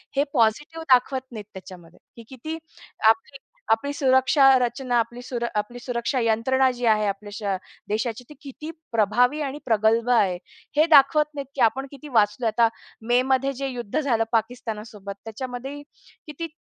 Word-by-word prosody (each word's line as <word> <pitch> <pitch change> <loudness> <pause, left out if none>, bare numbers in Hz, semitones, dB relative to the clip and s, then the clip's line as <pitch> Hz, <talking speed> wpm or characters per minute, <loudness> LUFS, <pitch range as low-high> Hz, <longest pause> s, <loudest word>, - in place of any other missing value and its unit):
हे 280 - +3
पॉझिटिव्ह 295 +8 +1
दाखवत 260 +1 +2
नाहीत 215 -3 -8
त्याच्यामध्ये. 180 -3 -12 0.2
ही 230 - -10
किती 310 +5 -6 0.5
आपली 225 +5 0 0.3
आपली 255 +6 +1
सुरक्षा 265 +1 +3
रचना 245 0 -1
आपली 235 +2 -3 0.4
आपली 210 +4 -3
सुरक्षा 240 +1 -2
यंत्रणा 255 +4 +2
जी 245 -1 -4
आहे 215 -1 +3
आपल्या 205 +1 -4
श 205 -3 -2 0.3
देशाची, 225 +3 -2
ते - - -10
किती 300 +2 -9 0.2
प्रभावी 240 +7 +2
आणि 285 +1 -4
प्रगल्भ 225 +1 +2
आहे. 190 -5 +3 0.4
हे 310 - +6
दाखवत 295 +1 +6
नाहीत, 280 -1 -4
की 260 - -2
आपण 270 +4 -4
किती 280 +2 -11
वाचलोय. 225 0 +2
आता 230 +1 +3 0.4
मेमध्ये 265 +2 +2
जे 275 - -2
युद्ध 245 +1 -3
झालं 240 -6 +1
पाकिस्तानसोबत 220 -3 -3
त्याच्यामध्ये 255 +5 -6 0.5
किती 330 +3 -5
245 Hz, 150 wpm, -24 LUFS, 220-270 Hz, 0.5 s, हे